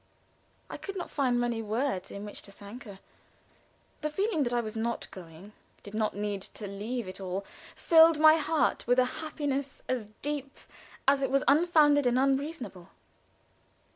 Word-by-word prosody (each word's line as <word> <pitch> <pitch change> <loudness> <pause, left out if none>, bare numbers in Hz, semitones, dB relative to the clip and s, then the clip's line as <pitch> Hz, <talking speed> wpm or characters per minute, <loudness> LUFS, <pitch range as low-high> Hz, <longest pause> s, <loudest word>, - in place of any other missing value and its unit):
I - - -7
could 395 - -7
not 360 - -5
find 255 -4 +1
many 240 -2 -1
words 220 -2 -2
in 200 +1 -7
which 205 - -7
to 200 - -11
thank 205 +6 -11
her. 200 -3 -10 1.0
The 305 - -1
feeling 385 +1 0
that 245 -3 0
I 240 - +1
was 220 -1 -4
not 230 +1 -2
going, 180 +3 -12 0.3
did 200 - -11
not 215 0 0
need 205 -1 -3
to 210 - -8
leave 210 +3 -4
it 185 +1 -8
all, 190 +1 -4 0.3
filled 325 -1 +6
my 310 +1 +8
heart 315 -4 0
with 245 +1 +4
a 255 - +5 0.2
happiness 285 -3 -3
as 245 -5 -2 0.2
deep 285 -2 -4 0.5
as 275 0 +4
it 270 - +1
was 275 0 +2
unfounded 295 -2 +5
and 245 0 +2
unreasonable. 270 - -1
250 Hz, 170 wpm, -29 LUFS, 210-290 Hz, 1.0 s, my